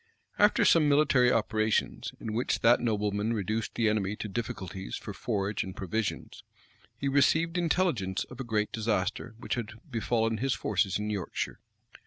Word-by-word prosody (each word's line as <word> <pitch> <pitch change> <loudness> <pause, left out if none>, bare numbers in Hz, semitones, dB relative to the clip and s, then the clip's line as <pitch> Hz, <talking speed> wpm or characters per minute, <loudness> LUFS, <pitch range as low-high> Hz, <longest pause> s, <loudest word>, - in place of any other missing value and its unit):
[*] - - -30
After 210 +1 +5
some 155 -3 +5
military 140 -4 +4
operations, 110 -1 0
in 110 - -5
which 120 +3 0
that 120 +1 +6
nobleman 105 -1 0
reduced 110 +1 -2
the 115 - +2
enemy 105 -1 0
to 105 - -5
difficulties 95 - -5
for - - -7
forage 100 0 -2
and 95 0 -8
provisions, 105 +2 -3 0.6
he 140 - -2
received 155 +5 +3
intelligence 165 - +1
of 125 - -12
a - - -2
great 105 -3 -1
disaster 110 -1 -1
which 120 - -4
had 115 -5 -3
befallen 115 -3 0
his 135 +2 +1
forces 95 -4 0
in 105 0 -3
Yorkshire. 100 -5 -3
110 Hz, 160 wpm, -29 LUFS, 105-125 Hz, 0.6 s, that